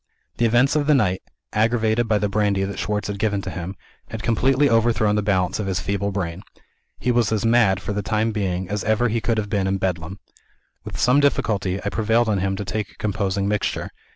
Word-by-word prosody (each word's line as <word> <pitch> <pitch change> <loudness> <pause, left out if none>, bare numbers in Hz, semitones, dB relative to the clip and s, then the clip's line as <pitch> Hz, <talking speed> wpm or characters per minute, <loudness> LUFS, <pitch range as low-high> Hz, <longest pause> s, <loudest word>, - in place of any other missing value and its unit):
The 120 - +2
events 120 +6 +3
of 150 -1 +1
the 150 - +5
night 95 -8 +1 0.3
(aggravated 115 +1 +2
by 110 -1 +2
the 105 - 0
brandy 100 -1 +1
that 100 +1 -4
Schwartz 105 0 -2
had 100 -1 -4
given 105 -1 0
to - - -5
him) 90 +2 -5 0.3
had 110 -2 -6
completely 130 +5 +3
overthrown 115 -3 +2
the 105 - +1
balance 95 -2 0
of 105 - -2
his 95 -1 -1
feeble 100 +2 -2
brain. 95 -2 -3 0.6
He 125 - 0
was 120 -3 +2
as 110 0 0
mad, 115 -5 +4
for 105 - -4
the 105 - -1
time 110 +2 0
being, 95 -4 -2
as 105 +1 -3
ever 110 +3 +2
he 115 +1 -1
could 115 0 0
have 105 -1 -1
been 100 -2 0
in 95 0 0
Bedlam. 90 -1 -3 0.7
With - - -7
some 125 +4 +4
difficulty, 100 -9 +1
I - - +1
prevailed 110 +2 +1
on 100 -2 +1
him 95 +1 -1
to 100 - -5
take 105 +1 -3
a - - -20
composing 100 -1 -1
mixture. 105 0 -1
105 Hz, 220 wpm, -22 LUFS, 95-115 Hz, 0.7 s, the